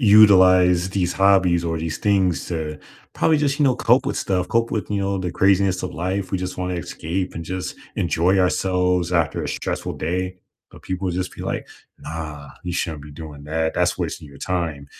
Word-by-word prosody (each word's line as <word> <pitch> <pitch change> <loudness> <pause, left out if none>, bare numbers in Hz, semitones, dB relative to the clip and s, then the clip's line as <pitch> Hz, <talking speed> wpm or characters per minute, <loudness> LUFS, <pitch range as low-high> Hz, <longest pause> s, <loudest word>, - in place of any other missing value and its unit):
utilize 95 -4 +6
these 90 -2 0
hobbies 95 -3 +4
or 80 -1 -1
these 80 0 -3
things 95 -4 +1
to 80 -3 -4 0.4
probably 155 -2 +3
just, 145 -1 0
you 150 - +3
know, 130 -2 +4
cope 125 +4 +3
with 140 - -1
stuff, 90 -2 0
cope 115 0 +1
with, 105 -4 -3
you 100 -1 0
know, 100 0 -1
the 90 -2 -3
craziness 95 -1 +2
of 90 -1 -4
life, 95 +3 -2
we 95 - 0
just 90 0 -5
wanna 90 0 -2
escape 90 +1 -4
and 85 - -5
just 95 +2 -4 0.2
enjoy 90 +2 +2
ourselves 90 -1 +1
after 85 -3 +1
a - - -3
stressful - - -3
day, 90 +3 -2 0.3
but - - -15
people 95 0 -2
just 90 +1 -3
be - - -8
like, - - -3 0.3
"Nah, 75 -2 -7
you 90 - -3
shouldn't 80 -4 -3
be 75 - -11
doing 75 -1 -9
that, 80 +1 -1
that's - - +1
wasting 75 - -4
your 70 0 -14
time." 80 -6 -3
90 Hz, 195 wpm, -22 LUFS, 85-95 Hz, 0.4 s, utilize